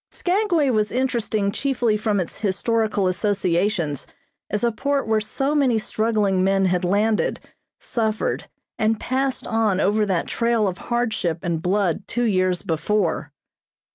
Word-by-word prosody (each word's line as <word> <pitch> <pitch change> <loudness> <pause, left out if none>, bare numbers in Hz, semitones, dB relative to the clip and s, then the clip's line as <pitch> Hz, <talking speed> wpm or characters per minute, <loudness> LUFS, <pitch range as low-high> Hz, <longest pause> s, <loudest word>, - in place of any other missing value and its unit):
Skagway 355 -7 +1
was 215 -2 +1
interesting 235 -5 0
chiefly 245 -2 0
from 210 -1 0
its 180 - -4
historical 215 0 0
associations 185 - 0 0.4
as 210 +2 -2
a 235 - +3
port 275 +3 -1
where 220 -1 +2
so 270 +7 -1
many 270 -6 +3
struggling 215 -3 +1
men 195 0 +2
had 180 -1 +1
landed, 205 +4 +1 0.4
suffered 220 -2 -2 0.3
and 220 0 +1
passed 265 +1 -1
on 220 -4 +1
over 210 +2 +2
that 185 -4 0
trail 230 -3 +1
of 185 -1 -4
hardship 220 -9 0
and 170 -3 -1
blood 190 +1 0
two 240 - -1
years 185 -5 +1
before. 165 -2 -1
215 Hz, 140 wpm, -22 LUFS, 190-235 Hz, 0.4 s, a